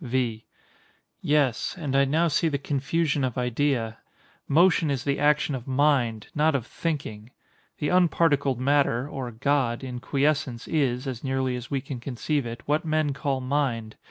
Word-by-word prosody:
V. 120 -3 -1 0.8
Yes; 145 -6 +1
and 145 -6 -3
I 140 0 +5
now 160 +5 +2
see 165 +2 +1
the 145 -3 0
confusion 145 +1 0
of 130 -2 -2
idea. 125 -2 0 0.5
Motion 165 +1 +4
is 135 -3 -1
the 140 -1 0
action 150 0 +2
of 125 -1 -5
mind, 130 -5 +2
not 155 0 +2
of 125 -5 -1
thinking. 125 -11 -4 0.5
The 150 - -1
unparticled 160 -7 +3
matter, 140 -2 +2
or 135 -4 -5
God, 125 0 0
in 125 -2 -5
quiescence, 140 -2 0
is 130 -5 0
(as 130 -4 -5
nearly 130 -1 -1
as 120 -1 -7
we 140 -2 -1
can 135 -2 -6
conceive 135 +2 -2
it) 115 0 -7
what 150 +2 +1
men 155 -3 0
call 135 -1 -2
mind. 130 -5 -1
140 Hz, 160 wpm, -26 LUFS, 125-150 Hz, 0.8 s, I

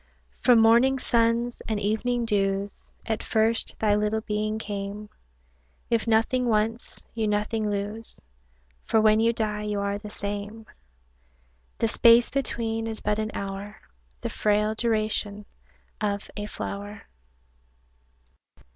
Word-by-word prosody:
From 245 -2 +6
morning 235 +4 +5
suns 235 -1 +1
and 220 -2 -1
evening 235 +4 0
dews 200 -2 -1 0.2
At 220 -1 -2
first 225 +1 +1
thy 210 -2 +2
little 210 +1 +1
being 215 0 -2
came; 205 0 -5 0.8
If 230 0 +1
nothing 230 +3 +2
once, 225 +1 -1
you 225 -2 -1
nothing 210 +1 0
lose, 205 +2 -4 0.6
For 220 - +2
when 215 0 +5
you 230 +1 +4
die 215 -2 -2
you 210 -1 -2
are 200 0 -2
the 210 0 -9
same; 205 +2 -5 1.1
The 230 - +1
space 235 +1 +5
between 225 -4 -1
is 220 -1 -3
but 210 0 -1
an 215 0 -1
hour, 200 +1 -6 0.4
The - - -3
frail 210 0 +1
duration 215 -2 -1 0.6
of 205 -1 -2
a 205 0 -4
flower. 205 0 -6
215 Hz, 125 wpm, -26 LUFS, 205-225 Hz, 1.1 s, From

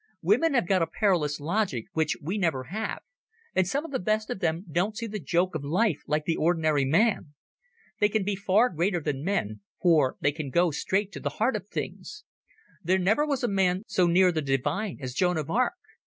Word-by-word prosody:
Women 330 -8 +3
have 240 -9 +2
got 190 -1 +2
a 165 - +1
perilous 165 -6 0
logic 165 - -1
which 160 -1 0
we 175 +7 -3
never 160 -9 0
have, 220 +1 -3 0.5
and 185 -1 +2
some 285 - -1
of 325 - -8
the 265 - -1
best 215 +3 -1
of - - -4
them 170 +2 -1
don't 180 +7 -1
see 230 - -3
the 210 -1 -5
joke 175 +4 0
of 155 -3 -4
life 170 +3 +1
like 150 0 0
the 165 - 0
ordinary 155 -4 +2
man. 165 - +1 0.6
They 210 - +4
can 215 -1 0
be 200 +1 -1
far 200 +5 +3
greater 175 +2 0
than 145 -3 -3
men, 155 - -1 0.2
for 155 -7 +3
they 145 - +2
can 150 -1 -5
go 170 +5 +2
straight 190 +7 -1
to - - -7
the - - -2
heart 235 +5 +1
of - - -5
things. - - -6 0.6
There 185 +3 +2
never 210 +11 +2
was 280 -4 -1
a - - +2
man 190 -2 +1
so 195 -4 +2
near 180 +2 +4
the 160 -2 -1
divine 145 - -1
as 130 -3 -5
Joan 180 +3 +1
of 155 0 -3
Arc. 250 - +1
180 Hz, 215 wpm, -27 LUFS, 155-210 Hz, 0.6 s, They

